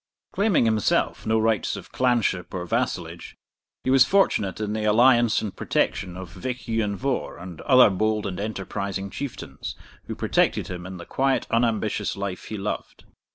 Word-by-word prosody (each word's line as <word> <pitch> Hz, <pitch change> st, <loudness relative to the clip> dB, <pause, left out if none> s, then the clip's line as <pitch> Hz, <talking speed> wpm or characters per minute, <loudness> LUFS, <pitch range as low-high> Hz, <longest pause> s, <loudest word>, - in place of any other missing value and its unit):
Claiming 200 Hz, -, +3 dB
himself 110 Hz, -1 st, +1 dB
no 110 Hz, 0 st, +3 dB
rights 110 Hz, -1 st, +1 dB
of -, -, -10 dB
clanship 120 Hz, -8 st, 0 dB
or 90 Hz, -1 st, -3 dB
vassalage, -, -, -3 dB, 0.5 s
he 130 Hz, -, +1 dB
was 135 Hz, -1 st, +7 dB
fortunate 130 Hz, -, +2 dB
in 105 Hz, -1 st, -2 dB
the 110 Hz, 0 st, -2 dB
alliance 120 Hz, +1 st, +4 dB
and 105 Hz, -, -5 dB
protection 90 Hz, 0 st, -1 dB
of 95 Hz, -2 st, -8 dB
Vich 125 Hz, +8 st, -5 dB
Ian 110 Hz, -3 st, 0 dB
Vohr 135 Hz, +6 st, -2 dB
and 85 Hz, -1 st, -9 dB
other 130 Hz, -6 st, +6 dB
bold 110 Hz, +2 st, 0 dB
and 95 Hz, -2 st, -4 dB
enterprising 100 Hz, -1 st, -4 dB
Chieftains, 140 Hz, +3 st, -6 dB, 0.3 s
who -, -, -5 dB
protected -, -, +1 dB
him 90 Hz, -1 st, -6 dB
in 95 Hz, 0 st, -7 dB
the 85 Hz, -, -9 dB
quiet 135 Hz, 0 st, +1 dB
unambitious 115 Hz, -3 st, 0 dB
life 100 Hz, -2 st, -4 dB
he 110 Hz, -, -5 dB
loved. 100 Hz, +1 st, -5 dB
110 Hz, 160 wpm, -25 LUFS, 95-120 Hz, 0.5 s, was